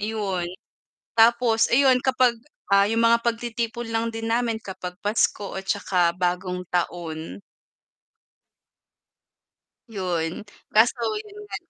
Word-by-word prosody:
'yon. 200 -5 -2 0.7
Tapos 230 0 +4
ayon 260 0 +5
kapag, 255 -2 +3 0.4
ah, 200 0 +6
yung 225 +1 +1
mga 230 0 +5
pagtitipon 235 0 -2
lang 225 +1 0
din 225 0 -4
namin 235 -1 +1
kapag 180 -2 -7
Pasko 205 -1 0
at 190 - -17
tsaka 180 -4 +1
bagong 180 0 -2
taon. 170 0 -3 2.5
'Yon, 180 -6 -2 0.4
kaso 235 +2 +3 0.2
yun 415 -1 -15
nga 415 - -6
220 Hz, 110 wpm, -24 LUFS, 180-235 Hz, 2.5 s, ah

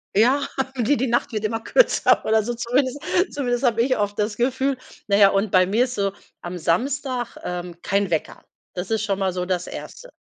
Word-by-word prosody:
Ja, 255 +7 +3 0.3
die 245 +4 +2
die 265 -1 -1
Nacht 240 +1 0
wird 215 -1 -2
immer 225 +1 -1
kürzer 485 - +3
oder 220 0 +3
so 240 +3 -2
zumindest 255 +4 0 0.3
zumindest 245 -3 -1
habe 235 -3 +3
ich 255 +1 +1
oft 205 -1 -1
das 210 0 -1
Gefühl. 265 +2 0 0.3
Na 200 -1 +3
ja, 200 -1 +7
und 195 +1 0
bei 185 -1 +5
mir 220 +7 +2
ist 250 - -6
so 200 -1 0 0.3
am 175 0 -6
Samstag, 255 - -1
ähm, 180 -1 -5
kein 200 -1 0
Wecker. 160 - -2 0.3
Das 180 +3 -5
ist 220 -1 +1
schon 200 -3 -1
mal 190 -2 0
so 180 0 -2
das 180 -1 -1
1. - - -9
220 Hz, 205 wpm, -23 LUFS, 195-250 Hz, 0.3 s, ja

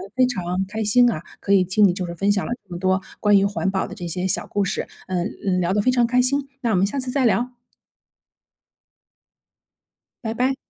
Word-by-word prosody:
非 255 0 +4
常 185 -6 -2
开 220 +2 -3
心 245 +4 +5
啊， 155 - -4 0.2
可 200 - 0
以 190 -2 +5
听 195 +3 +4
你 175 - +1
就 185 0 -3
是 170 - -6
分 200 +4 +1
享 200 -2 0
了 - - -5
这 180 - -24
么 175 - -5
多 185 0 +2 0.2
关 205 -1 +5
于 195 - +3
环 200 -1 -1
保 190 -1 -1
的 - - -9
这 175 -4 -6
些 180 +2 -2
小 - - -1
故 205 - 0
事， - - -2 0.2
嗯， 185 +1 -1 0.2
嗯， 180 -1 +1
聊 180 +1 +1
得 205 - +2
非 255 - +3
常 245 -2 +3
开 250 +1 +3
心， 275 +2 0
那 235 - 0
我 - - +2
们 185 +2 +3
下 275 +6 -3
次 255 -1 -3
再 265 -1 +1
聊。 245 +2 +1 2.7
拜 220 - -2
拜。 255 +3 +1
205 Hz, 245 characters per minute, -22 LUFS, 185-245 Hz, 2.7 s, 心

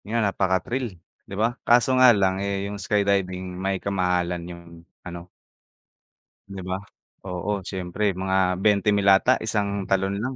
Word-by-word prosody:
Yan, 115 -1 +1
napaka-thrill, 100 +3 -1 0.3
'di 100 - -6
ba? 115 +3 +1
Kaso 120 +2 +3
nga 130 - +9
lang 95 -4 +2
eh, 100 0 -2
yung 100 0 -6
skydiving 95 -3 0
may 95 +1 -2
ka-mahalan 90 -2 -1
yung 85 -1 -10 0.4
ano 85 -1 -8 1.2
Di 95 -1 -7
ba? 95 - -1 0.5
Oo 90 +3 -2
siyempre 95 +1 -4 0.2
mga 95 0 0 0.3
20 105 0 +3
mil 100 -1 +1
ata 125 +6 +3
isang 105 -2 0 0.2
talon 95 0 +1
lang. 130 +2 -3
100 Hz, 145 wpm, -24 LUFS, 95-105 Hz, 1.2 s, nga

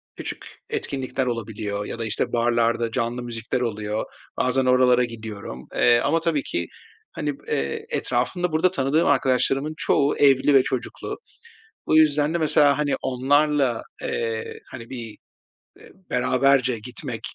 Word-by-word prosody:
küçük - - -6 0.2
etkinlikler 135 -1 -2
olabiliyor 105 -3 -3
ya 115 - -6
da, 115 - -2
işte, 110 - -2
barlarda 115 -1 +1
canlı 120 0 -2
müzikler 115 0 -3
oluyor. 105 -2 -2 0.3
Bazen 130 +1 +1
oralara 125 -1 +4
gidiyorum. 110 - -7
Eee, 120 0 +5
ama 165 - +1
tabii 165 -3 0
ki, 85 -1 -3 0.4
hani, 145 -2 -4
b - - -23
eee 70 0 -2
etrafımda 165 +9 -1
burada 160 +4 +2
tanıdığım 150 -1 +1
arkadaşlarımın 135 +2 +2
çoğu 145 -2 +2
evli 140 0 +4
ve 135 -2 +6
çocuklu. 130 -2 -4 0.7
Bu 155 - +4
yüzden 150 0 +4
de - - +1
mesela 150 -3 +3
hani 150 -2 +1
onlarla, 135 -1 +2 0.2
eee, 115 -1 -3
hani 115 -2 -9
bir, 115 -4 -7 0.7
eee, - - -16 0.2
beraberce 125 0 +2
gitmek 125 +1 -6
125 Hz, 140 wpm, -23 LUFS, 115-145 Hz, 0.7 s, ve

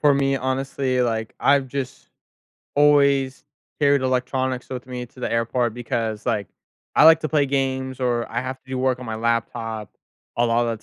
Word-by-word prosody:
for 145 -1 +5
me, 135 0 +2
honestly, 130 0 -1
like, 110 -2 -2
I've 140 -1 +3
just 130 -1 -6 0.7
always 140 -2 +3 0.4
carried 140 -2 +4
electronics 130 0 -1
with 125 -1 -6
me 125 -1 -5
to 125 - -17
the - - -2
airport 115 0 0
because, 115 -2 -3
like, 105 -6 0 0.5
I - - +6
like 160 0 +8
to 155 - -2
play 145 -3 +2
games 130 -1 -1
or 120 -2 0
I - - -1
have 130 +1 -5
to 130 - -31
do 130 - -3
work 130 -1 +1
on 125 - -8
my 110 - -3
laptop 115 -1 -2 0.5
a 120 - +3
lotta 115 0 +1
the 105 - -21
130 Hz, 185 wpm, -23 LUFS, 115-135 Hz, 0.7 s, like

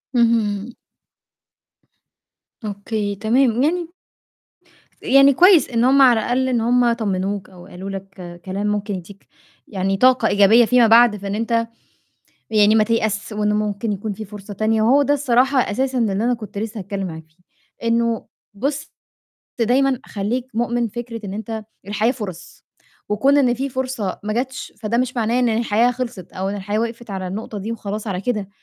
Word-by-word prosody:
اهم. 230 -2 +1 1.9
أوكي 205 0 -3
تمام، 235 +6 +2
من 335 +5 +1 1.1
يعني 275 +1 +5
كويس 360 +3 +5
إن 235 -2 +1
هم 270 +2 +5
على 245 -4 +6
الأقل 255 +4 0
إن 240 -3 +1
هم 240 +1 +3
طمِّنوك 200 -3 -2
أو 180 -2 -14
قالوا 190 +2 -8
لك 190 -3 -9
كلام 195 +2 -3
ممكن 205 -1 -2
يدّيك 190 +2 -11 0.4
يعني 195 0 -1
طاقة 255 0 +4
إيجابية 205 +4 +5
فيما 245 0 +4
بعد، 230 0 +6
فإن 200 0 -4
أنت 230 +1 0 0.8
يعني 215 -1 +4
ما 215 - +5
تيأس، 215 -1 -1
وإن 210 0 0
ممكن 210 +1 -1
يكون 205 +1 -4
فيه 215 - -7
فرصة 205 0 -10
تانية، 220 +2 +1
وهو 255 +6 +4
ده 285 - +2
الصراحة 265 -1 +2
أساسًا 260 +4 -1
اللي 225 -5 +1
أنا 230 +5 +1
كنت 215 -4 -8
لسّه 220 +1 -4
هاتكلّم 195 0 -4
معاك 160 -2 -8
فيه، 170 +3 -35 0.4
إنه 230 0 +1 0.3
بُص 280 +7 -3 0.7
دايمًا 255 +3 +2
خلّيك 230 +5 -3
مؤمِن 240 +1 0
فكرة 230 0 -7
إن 195 - -5
أنت 220 +1 -5 0.2
الحياة 215 +3 +1
فُرَص 200 -9 -9 0.4
وكون 265 +8 +3
إن 255 -4 +3
في 270 +3 -3
فرصة 255 -6 -3
ما 215 0 -2
جاتش، 260 +3 -4
فده 220 +2 -1
مش 255 +1 -1
معناه 230 +2 +1
إن 245 -2 +2
الحياة 230 +1 +2
خلصت 240 -7 -6
أو 190 +1 -3
إن 200 - -3
الحياة 205 +2 -2
وقفت 230 0 -4
على 190 -1 -4
النقطة 210 +3 -6
دي 205 +3 -4
وخلاص 215 -1 -5
على 190 -2 -3
كده 210 -3 -2
220 Hz, 165 wpm, -20 LUFS, 205-245 Hz, 1.9 s, على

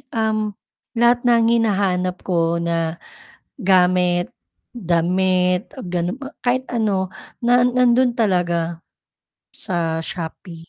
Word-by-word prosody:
uhm, 215 -2 -1 0.4
lahat 240 +1 +3
ng 235 -1 +4
hinahanap 185 -4 0
ko 170 -2 0
na 165 -1 -1 0.7
gamit, 180 -2 +2 0.4
damit, 180 -1 +1 0.2
gano 175 +3 -2
a 270 - -8
kahit 255 +1 0
ano 200 -5 0 0.3
na 245 +1 +4
nandoon 250 0 +3
talaga, 175 -5 0 0.8
sa 165 -3 -2
Shopee. 165 0 -7
185 Hz, 95 wpm, -20 LUFS, 175-230 Hz, 0.8 s, ng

